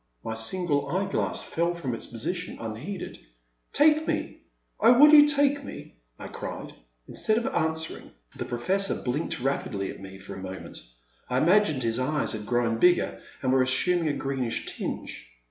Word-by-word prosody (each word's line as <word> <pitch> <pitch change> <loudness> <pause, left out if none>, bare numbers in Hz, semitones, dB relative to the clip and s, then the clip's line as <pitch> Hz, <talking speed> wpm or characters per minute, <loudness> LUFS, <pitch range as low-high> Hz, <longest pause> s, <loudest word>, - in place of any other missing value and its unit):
My 110 - -3
single 145 +4 0
eye 185 +5 0
glass - - -1
fell 170 +1 -1
from 135 -8 -3
its 115 - -6
position 175 +11 -4
unheeded. 115 - -6 0.5
Take 305 +1 +4
me! - - -2 0.4
Oh, 235 +2 +6
will 300 +3 +8
you 295 -1 +10
take 285 -1 +2
me? 265 - -10 0.2
I - - -8
cried. - - -7 0.3
Instead 215 - 0
of 235 - -1
an 160 -1 0
swering, 160 0 -6 0.3
the - - -4
Professor 190 +12 0
blinked 130 +5 -2
rapidly 120 -7 -2
at - - -11
me 95 0 -9
for 95 +1 -10
a 95 - -8
moment. 95 0 -8 0.5
I 125 - 0
imagined 160 -3 +3
his 115 +1 0
eyes 150 +4 0
had 105 -1 -5
grown 120 -2 +1
bigger, 180 0 +3 0.2
and 130 0 +2
were 130 - +4
assuming 165 +7 +2
a 145 - +1
greenish 135 -5 -2
tinge. - - -5
145 Hz, 170 wpm, -27 LUFS, 120-190 Hz, 0.5 s, you